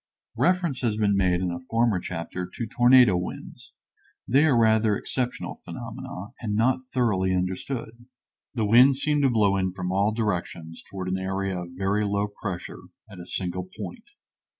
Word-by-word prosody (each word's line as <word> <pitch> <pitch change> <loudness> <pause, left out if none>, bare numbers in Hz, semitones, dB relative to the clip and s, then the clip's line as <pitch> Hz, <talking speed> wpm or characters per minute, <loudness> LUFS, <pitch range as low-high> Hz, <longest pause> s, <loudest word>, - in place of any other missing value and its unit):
Reference 175 -7 +1
has 115 -4 0
been 105 -2 +2
made 90 -2 +2
in 90 -1 -1
a 85 - -4
former 115 -4 +2
chapter 90 +1 -5
to 115 - -4
tornado 120 -3 +5
winds; 90 +1 -6 0.6
they 140 +5 +4
are 135 -6 +3
rather 110 -2 +3
exceptional 125 -2 -3
phenomena 115 +1 -7
and 105 -3 -2
not 130 +4 +2
thoroughly 105 -8 0
understood. 110 +6 -4 0.5
The 110 -3 0
winds 125 +5 +6
seem 150 +1 +1
to 135 - +4
blow 105 -4 +3
in 95 -1 -1
from 90 -1 -4
all 100 +3 +2
directions 90 -7 -3
toward 95 -2 -5
an 95 +1 -1
area 95 0 -2
of 85 0 -8
very 100 +2 +1
low 100 0 0
pressure 95 -5 -5 0.3
at 95 - -11
a 85 - -9
single 90 0 -4
point. 235 -3 -7
105 Hz, 165 wpm, -25 LUFS, 95-120 Hz, 0.6 s, winds